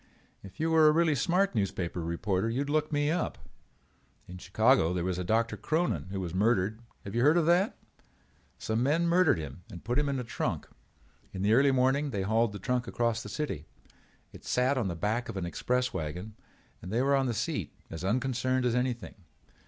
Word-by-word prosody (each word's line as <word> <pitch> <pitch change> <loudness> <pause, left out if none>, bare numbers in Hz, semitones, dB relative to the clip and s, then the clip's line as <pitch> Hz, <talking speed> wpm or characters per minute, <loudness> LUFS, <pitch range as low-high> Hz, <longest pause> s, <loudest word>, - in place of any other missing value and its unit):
If 95 -1 -13
you 165 +1 0
were 160 -1 +6
a - - +7
really 160 0 +3
smart 180 +7 +1
newspaper 95 -5 -2
reporter 95 +5 -1
you 120 +4 -1
would 145 0 -3
look 155 0 +1
me 145 0 +1
up. 170 0 -1 0.9
In 90 0 -9
Chicago 95 -2 +3
there 90 - -1
was 90 0 -2
a - - -2
Doctor 110 +3 +1
Cronin 155 - -1
who 95 0 -4
was 90 -3 -4
murdered. 110 +2 +1 0.2
Have 100 - -7
you 120 - +1
heard 150 +6 +5
of 170 - +3
that? 175 +5 +2 0.8
Some 110 +1 -1
men 150 +6 +2
murdered 170 - +4
him 75 0 -7
and 85 - -10
put 120 +5 0
him 145 -1 0
in 140 - -1
a 125 - -3
trunk. 115 - -3 0.7
In 95 - -4
the 105 +2 +3
early 140 +4 +5
morning 135 +3 +2
they 100 -6 -2
hauled 110 +2 +2
the 100 - -6
trunk 125 +1 -1
across 115 -1 0
the 105 - -8
city. 95 - -4 0.7
It - - -12
sat 125 +3 +1
on 120 -7 0
the 85 - -3
back 105 +8 -1
of - - -5
an 95 - -2
express 125 +8 -1
wagon 90 +7 -5 0.5
and 90 - -8
they 120 +4 +1
were 140 +1 +3
on 135 -1 +1
the 120 - -1
seat - - -2 0.2
as 80 +1 -6
unconcerned 130 +4 0
as 120 - +2
anything. 125 -2 -2
120 Hz, 205 wpm, -29 LUFS, 95-140 Hz, 0.9 s, a